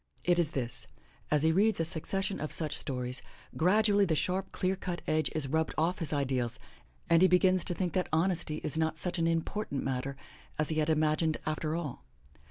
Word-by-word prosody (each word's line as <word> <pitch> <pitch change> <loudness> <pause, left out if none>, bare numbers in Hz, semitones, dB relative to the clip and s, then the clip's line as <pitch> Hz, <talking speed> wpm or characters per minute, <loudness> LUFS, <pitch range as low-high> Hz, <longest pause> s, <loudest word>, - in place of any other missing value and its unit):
It 175 0 +3
is 165 -4 +2
this 120 -2 -3 0.2
— 65 - -32
as 150 -1 +2
he 160 - +4
reads 205 +5 +3
a 165 - +1
succession 190 +4 -2
of 155 - -4
such 155 -3 +5
stories, 125 -1 -3 0.3
grad 195 +6 +3
ually 205 -2 +4
the 160 - +1
sharp, 185 +5 -1
clear 185 +1 0
cut 180 -2 -5
edge 155 -1 +1
is 155 -3 0
rubbed 160 +3 -1
off 165 +4 +1
his 165 - +1
ideals 130 -5 -1 0.5
and 165 0 +4
he 185 - +7
begins 185 0 +3
to 175 - -1
think 180 -2 -2
that 185 - 0
honesty 165 -1 +1
is 155 +1 -1
not 160 0 0
such 175 +2 0
an 165 - +2
important 165 -2 -2
matter 135 +1 -3 0.4
as 150 - 0
he 155 -1 0
had 155 +1 +1
imagined 155 0 +2
after 155 0 -2
all. 160 -7 -5
160 Hz, 205 wpm, -30 LUFS, 150-180 Hz, 0.5 s, he